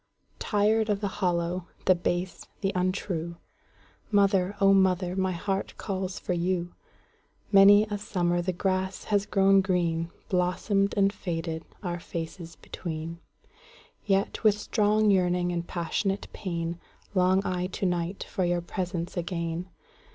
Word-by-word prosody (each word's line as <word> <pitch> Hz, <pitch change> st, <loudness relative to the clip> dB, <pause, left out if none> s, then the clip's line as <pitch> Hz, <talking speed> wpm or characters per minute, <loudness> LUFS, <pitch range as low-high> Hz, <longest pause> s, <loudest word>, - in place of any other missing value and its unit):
Tired 215 Hz, +1 st, +2 dB
of 205 Hz, -1 st, +1 dB
the 205 Hz, -, -1 dB
hollow, 175 Hz, 0 st, 0 dB, 0.2 s
the 185 Hz, -, +6 dB
base, 175 Hz, +1 st, -3 dB
the 195 Hz, -2 st, +1 dB
untrue, 180 Hz, -2 st, -2 dB, 0.7 s
Mother, 200 Hz, -2 st, +3 dB
O 195 Hz, 0 st, +6 dB
mother, 185 Hz, -2 st, +2 dB
my 190 Hz, -1 st, +1 dB
heart 195 Hz, +3 st, -3 dB
calls 190 Hz, -2 st, -3 dB
for 180 Hz, -, -2 dB
you! 175 Hz, 0 st, -1 dB, 0.8 s
Many 200 Hz, +1 st, +8 dB
a 210 Hz, -1 st, -4 dB
summer 175 Hz, -4 st, 0 dB
the 180 Hz, +2 st, -1 dB
grass 190 Hz, +1 st, -1 dB
has 205 Hz, -1 st, 0 dB
grown 195 Hz, 0 st, +5 dB
green, 170 Hz, -3 st, 0 dB, 0.2 s
Blossomed 195 Hz, +2 st, +1 dB
and 200 Hz, 0 st, +3 dB
faded, 165 Hz, -3 st, -4 dB, 0.2 s
our 175 Hz, -2 st, -3 dB
faces 170 Hz, 0 st, -6 dB
between:Yet, 170 Hz, -, -5 dB
with 210 Hz, -2 st, +5 dB
strong 210 Hz, 0 st, +2 dB
yearning 180 Hz, -2 st, +2 dB
and 170 Hz, 0 st, -3 dB
passionate 190 Hz, +3 st, -2 dB
pain, 170 Hz, -3 st, -3 dB, 0.3 s
Long 185 Hz, +1 st, +3 dB
I 180 Hz, 0 st, -1 dB
to 190 Hz, -, -3 dB
night 175 Hz, +1 st, -1 dB
for 190 Hz, -, -3 dB
your 175 Hz, 0 st, +1 dB
presence 175 Hz, 0 st, -4 dB
again. 170 Hz, 0 st, -3 dB
185 Hz, 130 wpm, -27 LUFS, 175-195 Hz, 0.8 s, Many